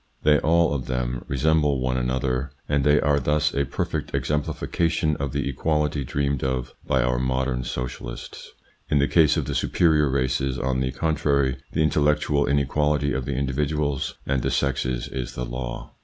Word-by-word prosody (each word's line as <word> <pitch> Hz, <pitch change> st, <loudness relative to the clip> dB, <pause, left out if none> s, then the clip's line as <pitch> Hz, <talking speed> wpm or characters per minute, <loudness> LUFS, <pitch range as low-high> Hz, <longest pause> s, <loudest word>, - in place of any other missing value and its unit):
They 75 Hz, -1 st, +5 dB
all 85 Hz, -1 st, +3 dB
of 65 Hz, -3 st, -3 dB
them 60 Hz, -1 st, -2 dB
resemble 75 Hz, 0 st, +2 dB
one 65 Hz, 0 st, 0 dB
another, 65 Hz, +1 st, -1 dB, 0.2 s
and 70 Hz, -2 st, +1 dB
they 75 Hz, +1 st, +5 dB
are 70 Hz, 0 st, +2 dB
thus 75 Hz, +2 st, +1 dB
a 70 Hz, 0 st, +1 dB
perfect -, -, -3 dB
ex -, -, -2 dB
emplification 75 Hz, +1 st, 0 dB
of 70 Hz, -1 st, -3 dB
the 70 Hz, -1 st, -2 dB
equality 75 Hz, +1 st, 0 dB
dreamed 70 Hz, +1 st, -1 dB
of 65 Hz, -1 st, -2 dB
by 65 Hz, -2 st, +2 dB
our 60 Hz, 0 st, +1 dB
modern 65 Hz, 0 st, -1 dB
socialists. 60 Hz, -1 st, -6 dB, 0.4 s
In 75 Hz, -, +3 dB
the 70 Hz, 0 st, +3 dB
case 80 Hz, -3 st, +4 dB
of -, -, 0 dB
the -, -, -3 dB
superior 75 Hz, -4 st, +2 dB
races, 65 Hz, 0 st, 0 dB
on 65 Hz, 0 st, -1 dB
the 65 Hz, 0 st, 0 dB
contrary, 70 Hz, -2 st, +1 dB, 0.2 s
the 80 Hz, -, +2 dB
intellectual 75 Hz, -1 st, +2 dB
inequality 70 Hz, 0 st, +1 dB
of 65 Hz, -1 st, -2 dB
the 70 Hz, -, -2 dB
individuals 70 Hz, +1 st, -1 dB
and 65 Hz, -1 st, 0 dB
the -, -, 0 dB
sexes 65 Hz, -2 st, -1 dB
is 65 Hz, -2 st, -5 dB
the 60 Hz, -, -3 dB
law. -, -, -6 dB
70 Hz, 170 wpm, -24 LUFS, 65-75 Hz, 0.4 s, They